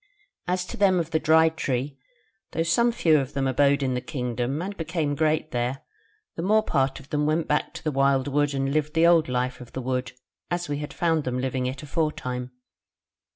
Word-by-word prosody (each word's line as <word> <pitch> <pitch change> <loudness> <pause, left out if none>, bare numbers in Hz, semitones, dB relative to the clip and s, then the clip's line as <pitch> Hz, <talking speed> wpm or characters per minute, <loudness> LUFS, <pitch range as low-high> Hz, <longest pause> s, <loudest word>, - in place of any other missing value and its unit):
As 180 0 0
to - - -8
them 190 -3 +4
of 165 -1 -3
the 160 - +2
Dry 160 +1 +5
Tree, 135 -3 -3 0.5
though 165 - +1
some 235 +9 +3
few 160 -9 +3
of 135 0 -4
them 135 -1 -1
abode 140 +2 +3
in 130 -1 0
the 125 - -2
kingdom, 125 0 -3
and 195 +4 -4
became 160 -3 -2
great 155 +1 0
there, 125 +2 -2 0.5
the - - -4
more 215 +4 +3
part 135 -7 0
of 135 - -16
them 150 0 +1
went 155 +1 +1
back 150 - 0
to - - -8
the 155 - 0
wildwood 140 +1 +2
and 135 0 -1
lived 150 +1 -1
the 165 +1 +5
old 170 -4 +5
life 125 0 -1
of 125 - -12
the 130 - -4
Wood, 125 0 -2 0.4
as 175 0 -2
we 145 0 -2
had 150 0 -5
found 165 -3 +1
them 125 -1 -2
living 130 0 -1
it 135 +3 -5
aforetime. 130 -5 -2
145 Hz, 205 wpm, -25 LUFS, 130-160 Hz, 0.5 s, Dry